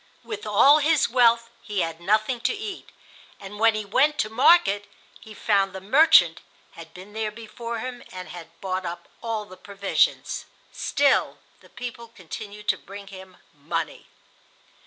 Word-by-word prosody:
With 425 - -7
all 275 +9 +6
his 305 0 +3
wealth 235 -2 +4
he 205 -3 -2
had 165 0 -3
nothing 215 +6 +1
to 455 - 0
eat, 410 -2 -7 0.5
and 200 +1 -10
when 225 0 +4
he 215 -1 -3
went 290 +9 +2
to 215 -5 -1
market 220 - +4 0.3
he 215 -1 -13
found 195 -3 +1
the 190 - -6
"merchant" 205 - +5 0.3
had 165 -1 -12
been 190 +3 -13
there 220 0 -2
before 230 +2 -7
him 245 +2 -6
and 185 -1 -8
had 165 -1 -11
bought 185 -1 -2
up 170 -1 -6
all 225 -2 -3
the 185 -2 -14
provisions. 200 - -1 0.3
Still, 285 -1 +1 0.2
the - - -20
people 235 -1 -8
continued 210 0 -10
to - - +2
bring 200 0 -11
him 190 -1 -12 0.2
money. 160 +2 -5
210 Hz, 155 wpm, -24 LUFS, 190-235 Hz, 0.5 s, all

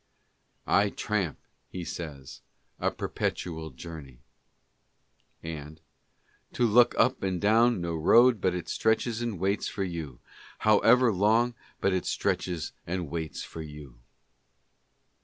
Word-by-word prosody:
"I 100 +1 +3
tramp," 100 -7 -2 0.3
he 90 -2 -6
says, 70 -7 -7 0.4
"a - - +1
perpetual 80 -2 -3
journey" 70 -3 -10 0.6
— - - -43 0.2
And— 75 +2 -11 0.4
" - - -37
To 125 - +2
look 120 +2 +5
up 130 +1 +3
and 95 -2 -1
down 115 +1 +3
no 85 -1 -2
road 115 +7 +5
but 90 -1 +1
it 90 - -5
stretches 110 +1 0
and 115 -4 -2
waits 95 +3 0
for 100 - -3
you, 80 -8 -5 0.4
however 115 +3 +5
long 110 +5 +3 0.3
but 95 - +2
it 95 - -1
stretches 85 -3 -1 0.2
and 85 -4 -3
waits 80 -2 -4
for 80 - -8
you. 75 -5 -10
90 Hz, 130 wpm, -28 LUFS, 80-110 Hz, 0.6 s, look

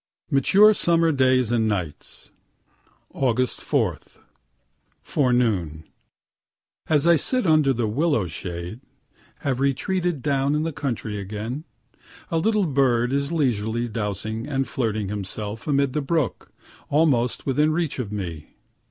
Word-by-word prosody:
MATURE 200 +10 +6
SUMMER 165 -4 +3
DAYS 130 -4 +2
AND 115 -2 +2
NIGHTS 90 -8 -4 0.8
Aug. 125 -3 0
4. - - -1 1.1
Forenoon 110 - 0 1.1
as 150 -1 +3
I 170 0 +6
sit 255 - 0
under 155 -4 +4
the 120 -3 0
willow 130 - +1
shade, 85 +4 -6 0.6
(have 130 -3 -1
retreated 160 +3 0
down 140 0 +1
in 150 - 0
the 165 -1 -3
country 115 -7 -3
again,) 110 - -5 0.7
a 165 - +2
little 210 +2 +2
bird 130 -4 +2
is 140 +1 0
leisurely 120 -6 0
dousing 110 +1 -4
and 135 -2 -1
flirting 110 -5 -2
himself 105 +3 -5
amid 140 -2 +1
the 150 - 0
brook 145 -2 -2 0.4
almost 140 -6 +2
within 150 +3 +2
reach 160 -3 -1
of 110 -5 -4
me. 85 -7 -6
130 Hz, 125 wpm, -23 LUFS, 110-150 Hz, 1.1 s, MATURE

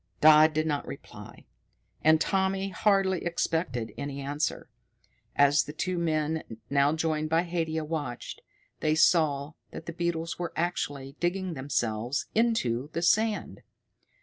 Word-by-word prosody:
Dodd 155 0 +7
did 155 0 +1
not 145 -2 -2
reply, - - -10 0.6
and 155 0 +5
Tommy 190 +2 0
hardly 195 -1 +2
expected 160 - -1
any 140 -1 -4
answer. 145 +2 -2 0.7
As 145 +1 +4
the 150 - -7
two 180 +3 -2
men, 155 -1 0 0.3
now 140 0 +4
joined 155 -1 -1
by 165 +2 +3
Haidia, 165 -2 -2
watched, 150 -6 -5 0.4
they 155 0 +1
saw 155 -3 +3 0.2
that - - -9
the 170 - -6
beetles 170 -1 -2
were 175 -1 -3
actually 145 -5 -3
digging 180 +1 -1
themselves 120 -3 -2
into 150 - +1
the 170 - -2
sand. 215 +4 +1
160 Hz, 130 wpm, -28 LUFS, 145-175 Hz, 0.7 s, Dodd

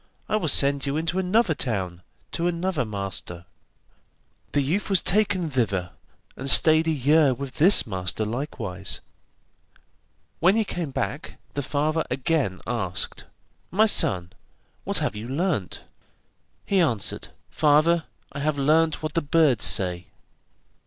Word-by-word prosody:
I - - 0
will 210 -7 -1
send 140 0 +3
you 140 +2 -1
into 165 +3 -1
another 190 0 +2
town, 95 - -3 0.3
to 170 - -1
another 175 -5 -1
master.' 95 -4 -4 1.1
The 145 - +1
youth 180 +11 -1
was 195 -3 +4
taken 195 -2 +1
thither, 105 - -1 0.4
and 135 - -4
stayed 155 +4 +6
a - - +2
year 145 -1 +3
with 135 +1 -8
this 180 +2 +4
master 95 0 -3
likewise. 105 -6 -3 1.4
When 185 +5 +4
he 225 - +2
came 175 -5 -4
back 140 +2 -4 0.2
the 145 - -2
father 150 +3 -1
again 130 - -1
asked: 110 -7 -3 0.4
'My 215 +4 +3
son, 90 - +1 0.5
what - - -1
have - - -1
you 105 +2 -6
learnt?' 145 - -2 0.8
He 195 - +1
answered: 115 - 0 0.2
'Father, 155 +2 +3 0.3
I 140 - -7
have 150 0 -1
learnt 155 +3 +2
what 155 -1 -3
the 165 - +1
birds 145 -6 +3
say. 90 -3 +1
145 Hz, 135 wpm, -24 LUFS, 110-165 Hz, 1.4 s, stayed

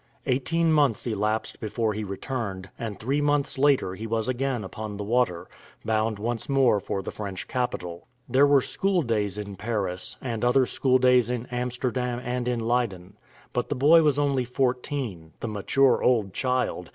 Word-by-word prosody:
Eighteen 160 +6 +1
months 140 -8 +2
elapsed 110 -1 -1
before 110 0 -1
he 110 +1 -4
returned, 100 -2 -5
and 110 -4 -5
three 135 +6 0
months 145 -2 0
later 135 -9 +3
he 110 +4 -6
was 110 0 -1
again 130 -2 -1
upon 105 +1 -6
the 105 - -4
water, 110 -6 0 0.4
bound 110 0 0
once 115 +3 -3
more 130 -6 +4
for 95 0 -4
the - - -5
French 100 -3 -6
capital. 90 -9 -3 0.2
There 140 +2 +4
were 140 -2 +5
school 190 -3 +1
days 105 -5 -1
in 100 -2 -6
Paris, 100 -4 -3
and 115 -3 -4
other 125 +2 +4
school 130 +1 +2
days 125 -2 +4
in 125 -1 -2
Amsterdam 125 0 -2
and 125 0 -2
in 120 -2 0
Leyden; 110 -6 -1 0.4
but 125 - -1
the 145 - -1
boy 150 +6 +6
was 150 -3 +3
only 140 -3 +1
fourteen, 125 - -2
the - - -4
mature 120 +5 +2
old 110 -7 +2
child! 125 -9 -1
120 Hz, 170 wpm, -26 LUFS, 105-130 Hz, 0.4 s, boy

